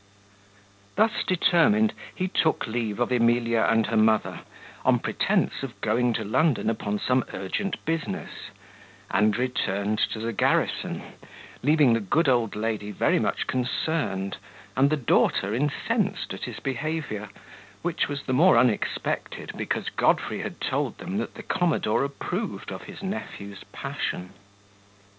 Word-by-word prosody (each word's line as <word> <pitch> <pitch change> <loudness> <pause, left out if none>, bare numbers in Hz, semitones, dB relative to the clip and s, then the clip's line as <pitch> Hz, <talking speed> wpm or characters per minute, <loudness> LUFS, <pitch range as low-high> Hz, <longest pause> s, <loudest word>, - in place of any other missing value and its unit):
Thus 220 +2 +2
determined, 195 +5 +4 0.2
he 185 - -1
took 160 -3 +1
leave 110 -2 -2
of 120 +1 +1
Emilia 115 -1 +3
and 115 -1 +3
her 115 - -2
mother, 110 0 +3 0.4
on - - +4
pretence - - 0
of - - -7
going 120 +2 +2
to 110 - -2
London 125 +3 +2
upon 105 -2 -2
some 125 +3 +1
urgent 95 - -3
business, 165 0 -2 0.8
and 105 +3 +3
returned 105 -4 -1
to - - -3
the 115 +1 -3
garrison, - - +1 0.6
leaving 145 -2 +5
the 115 - +2
good 145 - +1
old 120 -4 +2
lady 105 -1 -2
very 105 - +2
much - - 0
concerned, 125 -6 -1 0.4
and 135 +3 +4
the 155 - +1
daughter 105 -5 +2
incensed 140 +4 -1
at - - -5
his - - -6
behaviour, 135 -5 -3 0.5
which 175 -1 0
was 145 -1 -4
the 130 - -2
more 160 +1 +6
unexpected, 120 -3 0
because - - -2
Godfrey - - +1
had - - -5
told 140 -1 -1
them 185 +3 -4
that - - -4
the 225 - -8
commodore 170 - +1
approved 180 +9 -4
of - - -7
his - - -10
nephew's 100 - -6
passion. 90 +1 -4
125 Hz, 140 wpm, -26 LUFS, 110-160 Hz, 0.8 s, more